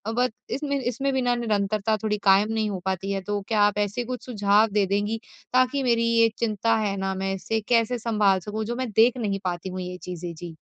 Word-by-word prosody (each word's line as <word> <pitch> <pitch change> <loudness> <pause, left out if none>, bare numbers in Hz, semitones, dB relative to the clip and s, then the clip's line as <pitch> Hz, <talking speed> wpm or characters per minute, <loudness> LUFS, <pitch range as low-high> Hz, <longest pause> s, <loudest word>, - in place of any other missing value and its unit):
But 250 0 +2 0.2
इसमें 280 0 -2
इसमें 265 +2 -1
भी 265 - +1
ना 245 -1 +2
निरंतरता 215 -2 0
थोड़ी 210 -1 0
कायम 200 +2 +4
नहीं 220 -1 0
हो 195 -2 -3
पाती 190 +1 -2
है। 195 -1 -1
तो 205 +1 -3
क्या 215 -2 +2
आप 205 0 +3
ऐसे 205 +4 -1
कुछ 250 -2 -6
सुझाव 210 -2 +3
दे 205 -1 +2
देंगी? 205 +3 -1 0.3
ताकि 255 +2 +3
मेरी 235 -2 +2
ये 230 0 +5
चिंता 225 0 +1
है 210 -2 -1
ना, 190 0 -1
मैं 195 0 -2
इसे 220 +4 -2
कैसे 235 0 +2
संभाल 210 -4 +2
सकूँ 210 +4 -4
जो 240 +2 -3
मैं 255 -1 -3
देख 230 +4 +4
नहीं 205 -5 -1
पाती 180 0 -3
हूँ 185 0 -5
ये 180 0 -6
चीज़ें। 175 -1 -6
जी। 170 0 -9
210 Hz, 225 wpm, -25 LUFS, 195-235 Hz, 0.3 s, ये